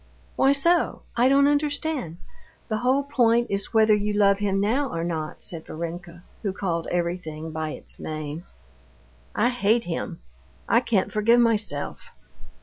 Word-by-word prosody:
"Why 270 - +4
so? 335 +5 +2
I 245 +2 +4
don't 280 +1 +5
understand. 290 - -1 0.5
The 215 - 0
whole 260 +4 +2
point 240 -4 +2
is 200 0 -2
whether 220 -1 +5
you 210 0 0
love 200 -1 +3
him 195 -1 0
now 250 +8 +1
or 165 -4 -3
not," 160 -3 -4
said 165 -2 -6
Varenka, 170 +1 -7 0.2
who 200 -3 -2
called 170 -4 -2
everything 170 -3 -3
by 155 0 -3
its - - -10
name. 155 +1 -5 0.9
"I 235 +3 +3
hate 235 -1 +2
him; 170 -1 -4 0.5
I - - +5
can't 225 -6 0
forgive 230 +3 +4
myself." 215 -11 +1
205 Hz, 145 wpm, -25 LUFS, 170-245 Hz, 0.9 s, don't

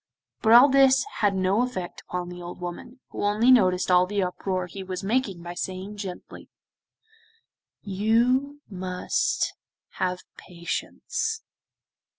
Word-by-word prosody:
But 220 0 +4
all 245 +4 +9
this 270 +1 +5
had 205 -2 +2
no 190 +4 +2
effect 190 -9 -4
upon 180 -1 -3
the 180 0 -9
old 175 0 -8
woman, 180 +9 -8
who - - -5
only 215 +5 +4
noticed 185 -7 +4
all 180 0 +5
the 205 0 0
uproar 185 0 -2
he 185 +3 -8
was 185 0 -5
making 200 -5 -1
by 175 0 -6
saying 190 +3 -5
gently: 190 -3 -8 1.3
'You 240 +8 +1
must 185 -2 -1 0.5
have 180 -1 -1 0.2
patience. 180 - -4
195 Hz, 130 wpm, -25 LUFS, 180-235 Hz, 1.3 s, all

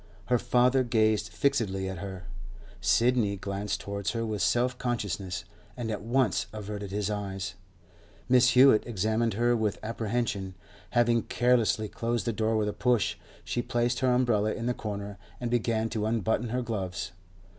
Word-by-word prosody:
Her 125 -1 +4
father 125 +2 +3
gazed 110 -3 +2
fixedly 95 -2 0
at 95 -2 -5
her; 95 -2 -6 0.6
Sidney 115 -4 +2
glanced 100 +1 -3
towards 100 +1 -3
her 115 -1 -1
with 110 -2 -2
self 125 +1 +2
consciousness, 100 -6 -3 0.3
and 115 -2 -3
at 105 - -3
once 115 -6 +1
averted 105 -1 -6
his 105 +1 -2
eyes; 95 -2 -4 0.7
Mrs. 125 0 +5
Hewett 130 -3 +6
examined 110 0 0
her 120 +2 +3
with 110 -3 0
apprehension. 110 -3 -2 0.4
Having 120 -1 +3
carelessly 120 -3 +2
closed 115 0 -2
the 115 - 0
door 110 +1 +1
with 105 -1 +1
a - - -3
push, 120 -6 +2 0.3
she 120 - -1
placed 120 0 0
her 130 -1 +2
umbrella 120 -4 +2
in 115 - -4
the 125 - +1
corner 100 -3 -5 0.2
and 120 -1 -3
began 115 -2 +1
to 110 -2 -1
unbutton 110 +1 0
her 125 +2 -1
gloves. 95 -7 -3
110 Hz, 155 wpm, -28 LUFS, 100-120 Hz, 0.7 s, Hewett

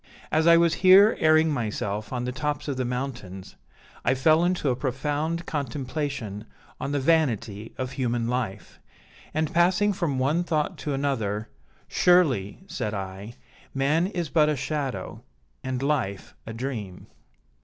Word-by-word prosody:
As 160 +1 +2
I 170 0 +8
was 170 -1 +3
here 195 +4 +7
airing 155 0 +4
myself 105 -4 -3
on 125 -1 -2
the 125 - -2
tops 145 +3 -3
of 140 - -1
the 130 - -1
mountains, 120 -7 -5 0.5
I 125 - +2
fell 155 +5 +4
into 175 -6 +1
a - - 0
profound 150 +6 -2
contemplation 135 -6 -4 0.3
on 140 - -3
the 145 - 0
vanity 120 -9 0
of 130 -1 -3
human 120 -3 -1
life; 115 -6 -4 0.5
and 155 0 -1
passing 185 +4 +3
from 170 -8 -1
one 145 +7 +1
thought 155 -4 -1
to 145 -2 -2
another, 110 -7 -2 0.4
'Surely,' 155 - +2
said 105 - -4
I, 95 +3 -6 0.4
'man 150 +6 +2
is 175 -4 -3
but 150 0 +3
a 150 - +1
shadow, 140 -1 -4 0.4
and 130 0 -3
life 130 -10 -1
a 115 - -5
dream.' 115 -6 -5
135 Hz, 145 wpm, -26 LUFS, 115-155 Hz, 0.5 s, I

